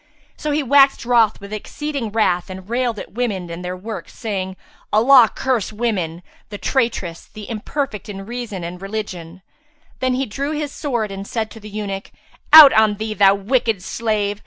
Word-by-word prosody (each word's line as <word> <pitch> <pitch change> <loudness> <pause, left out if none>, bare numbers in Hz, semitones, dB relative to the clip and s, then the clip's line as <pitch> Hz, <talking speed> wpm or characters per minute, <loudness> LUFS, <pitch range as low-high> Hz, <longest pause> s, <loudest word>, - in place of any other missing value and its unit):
So 305 - -4
he 295 0 +1
waxed 275 -1 +4
wroth 235 -3 +3
with 200 +1 -9
exceeding 275 +2 -4
wrath 185 -5 +1
and 185 0 -9
railed 240 -1 -1
at - - -8
women 200 -7 -3
and 170 +2 -7
their 180 +1 -4
works, 215 +3 -8
saying, 190 -4 -4 0.4
"Allah 235 +1 +6
curse 250 -7 -1
women, 190 -7 -2 0.3
the 205 - -6
traitresses, 225 -10 -2
the 210 -1 -10
imperfect 230 0 -4
in 195 -1 -7
reason 235 -5 -6
and 175 +2 -7
religion!"[FN#359] 200 - -9
Then 255 -1 +1
he 270 +1 -1
drew 280 +7 -3
his 300 -1 -3
sword 240 -10 -2
and 195 0 -7
said 220 -2 -3
to 225 - -11
the 210 0 -10
eunuch, 200 -1 -5 0.4
"Out 305 -3 +11
on 215 -1 +4
thee, 215 +1 -4
thou 200 -1 +5
wicked 220 -1 0
slave! 210 -2 -1
215 Hz, 175 wpm, -20 LUFS, 195-245 Hz, 0.4 s, Out